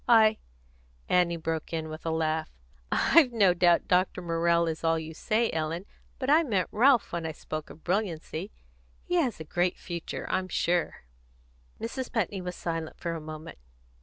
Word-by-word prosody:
I 220 -2 +6 0.3
" - - -33 0.3
Annie 175 -1 +3
broke 160 0 -3
in 160 -1 -2
with 155 +1 -7
a - - +2
laugh. 160 -1 0 0.4
"I've 315 -7 +5
no 200 -6 +4
doubt 175 -1 +3
Dr. 180 0 +2
Morrell 170 0 +2
is 160 0 -3
all 165 0 +3
you 160 0 -6
say, 225 +7 0
Ellen, 160 +3 -2 0.3
but 260 - -3
I 305 +4 +6
meant 210 - 0
Ralph 250 +1 +4
when 170 -1 -3
I 160 -1 -3
spoke 155 0 -6
of 160 - -13
brilliancy. 180 -1 -2 0.5
He - - -5
has 260 - +1
a - - -5
great 175 +3 0
future, 170 -2 -5
I'm 185 - 0
sure." 175 -1 0 0.8
Mrs. 255 +3 -4
Putney 200 -4 -1
was 180 0 -5
silent 165 -2 -4
for 170 - -3
a 165 - -5
moment. 155 - -9
170 Hz, 175 wpm, -28 LUFS, 160-210 Hz, 0.8 s, I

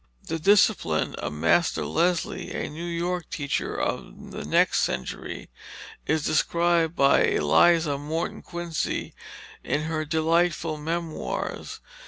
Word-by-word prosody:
The 165 0 -4
discipline 195 - +3
of - - -4
Master 80 - +2
Leslie, 170 +1 0
a - - -3
New 165 +3 -6
York 175 0 -2
teacher 145 -3 -2
of - - -4
the - - -6
next - - +3
century, 65 -1 -4 0.6
is 155 -1 +1
described 170 0 +2
by 140 0 +5
Eliza 145 - +3
Morton 160 +4 -3
Quincy 175 -2 -3 0.5
in 150 - -1
her 160 0 -2
delightful 160 +1 +1
Memoirs. 165 +1 -4
160 Hz, 115 wpm, -25 LUFS, 150-170 Hz, 0.6 s, by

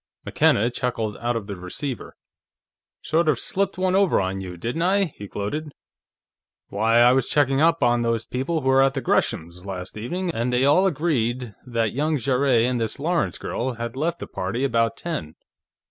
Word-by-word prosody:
McKenna 115 +4 +3
chuckled 115 -4 -2
out 120 0 -1
of 115 -3 -3
the 100 -1 -6
receiver. 105 +9 -6 0.9
"Sort 160 +1 +2
of 145 - +2
slipped 195 +8 -2
one 185 0 +1
over 195 -1 +3
on 95 0 -2
you, 90 -2 -7
didn't 120 - -3
I?" 195 +3 +3
he 100 - -8
gloated. 145 +11 -4 1.0
"Why, 110 +3 +2
I 120 +1 +7
was 130 -1 +1
checking 140 -1 +2
up 165 +1 +3
on 120 0 +3
those 115 -1 0
people 145 +6 -2
who 130 - 0
were 135 0 +5
at 135 -1 +1
Gresham's, 85 +2 -1
last 95 -2 -6
evening, 170 +11 -3
and 120 0 -1
they 125 +2 +2
all 180 +7 +5
agreed 130 - -1
that 115 -3 0
young 150 +4 0
Jarrett 130 -2 +2
and 125 -1 0
the 110 - -2
Lawrence 170 +4 0
girl 125 +2 -3
had 120 +1 -5
left 165 +5 -1
the - - -6
party 100 +8 -3
about 115 -4 +1
ten. 85 - -5
125 Hz, 180 wpm, -23 LUFS, 115-155 Hz, 1.0 s, I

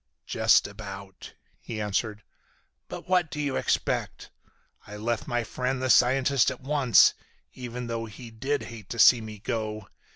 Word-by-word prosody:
"Just - - +3
about," 100 -2 -9 0.2
he 110 -2 -7
answered. 105 +1 -2 0.6
"But - - -8
what 180 -3 +2
do 150 - -6
you 140 -3 -1
expect? - - -2 0.6
I 105 0 -8
left 115 +2 -2
my 120 0 -1
friend 125 +3 -3
the 130 0 +1
scientist 130 +1 +4
at - - -7
once, 135 -4 +4 0.4
even 125 -1 -6
though 115 -1 -3
he 115 +2 -11
did 135 +6 -2
hate 115 -4 -10
to 120 - -5
see 120 0 +7
me 110 -1 -8
go. 110 0 -4
115 Hz, 155 wpm, -27 LUFS, 110-130 Hz, 0.6 s, see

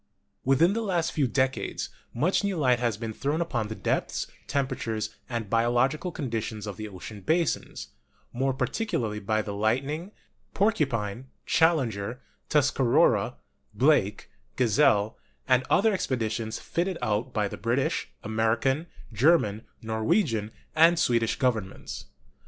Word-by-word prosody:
Within 135 +8 +4
the 230 - -1
last 175 -6 0
few 145 -5 +1
decades 130 +2 -1 0.2
much 170 - +1
new 200 -3 -1
light 125 -5 +3
has 120 -4 0
been 115 0 -4
thrown 145 +7 -1
upon 125 -11 -1
the 110 - -5
depths, - - -1 0.2
temperatures, 115 -6 -2 0.2
and 115 -3 -3
biological 120 - +1
conditions 115 -7 -4
of 105 -2 -5
the 110 +3 -6
ocean 100 +1 -9
basins, 160 - -1 0.4
more 135 +2 +1
particularly 130 - -2
by 110 +1 0
the 100 - -5
Lightning, 135 - -1 0.4
Porcupine, 130 - 0 0.2
Challenger, 125 -9 +1 0.3
Tuscarora, 135 -4 +3 0.4
Blake, - - +2 0.2
Gazelle, 115 -3 +3 0.3
and 130 -1 +4
other 220 +2 +4
expeditions 115 - -2
fitted 175 +1 -2
out 110 +2 0
by 105 -3 0
the - - -6
British, 120 +4 -1
American, 115 +8 +1 0.3
Ger 150 +11 +6
man, 105 -4 -5 0.2
Norwegian 110 - +1 0.3
and 165 +2 +6
Swedish 115 -7 +2
Governments. 115 -7 -2
125 Hz, 125 wpm, -27 LUFS, 110-155 Hz, 0.4 s, Ger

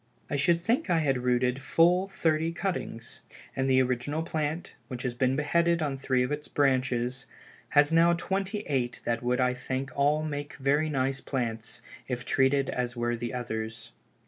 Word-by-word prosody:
I - - +1
should 170 +4 +3
think 225 +3 0
I 175 - +3
had 135 -5 +1
rooted 125 +1 +1
full 175 +6 +3
thirty 165 -4 0
cuttings, 170 -11 -4 0.3
and 135 0 0
the 130 0 +5
original 130 +5 -1
plant, 155 0 -3
which 125 -2 -6
has 125 -2 -1
been 130 +2 +1
beheaded 170 +3 +2
on 140 -2 -1
three 130 -1 +1
of 125 - -2
its 150 0 -3
branches, 130 -2 0 0.5
has 145 +2 +5
now 170 +1 +5
twenty 195 +4 -2
eight 130 -4 -1
that 115 0 0
would 125 +1 0
I 125 0 +3
think 130 +1 -4
all 145 +2 +2
make 145 -1 -4
very 145 +3 +1
nice 135 -1 -1
plants, 115 -4 -3 0.2
if 125 -1 -3
treated 135 +1 +2
as 125 0 -2
were 120 0 0
the 120 0 -4
others. 110 -3 -5
135 Hz, 170 wpm, -28 LUFS, 125-155 Hz, 0.5 s, the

